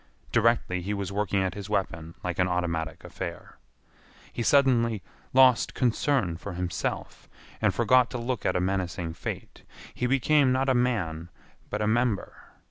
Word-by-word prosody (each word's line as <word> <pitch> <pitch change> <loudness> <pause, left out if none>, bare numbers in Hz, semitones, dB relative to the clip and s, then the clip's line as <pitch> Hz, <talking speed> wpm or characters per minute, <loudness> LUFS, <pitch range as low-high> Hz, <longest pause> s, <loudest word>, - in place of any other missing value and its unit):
Directly 115 -5 +2
he 100 +4 -2
was 100 -1 -4
working 100 -1 0
at 95 -2 -1
his 100 -1 -7
weapon 85 -5 -2
like 90 0 -3
an 90 - +3
automatic 85 -2 -2
affair. - - -7 0.8
He - - -3
suddenly 115 - +3 0.3
lost 130 -2 +5
concern 120 - +1
for 95 +2 -7
himself, 90 -1 -4 0.3
and - - +3
forgot 125 -1 +4
to 125 - -4
look 120 -1 -3
at - - 0
a - - +2
menacing 90 -2 -2
fate. - - -7 0.3
He 125 - -1
became 135 +1 +3
not 130 +1 +1
a - - +4
man 90 -10 0 0.4
but 105 +1 -2
a - - +1
member. 115 -2 +1
105 Hz, 155 wpm, -27 LUFS, 90-125 Hz, 0.8 s, lost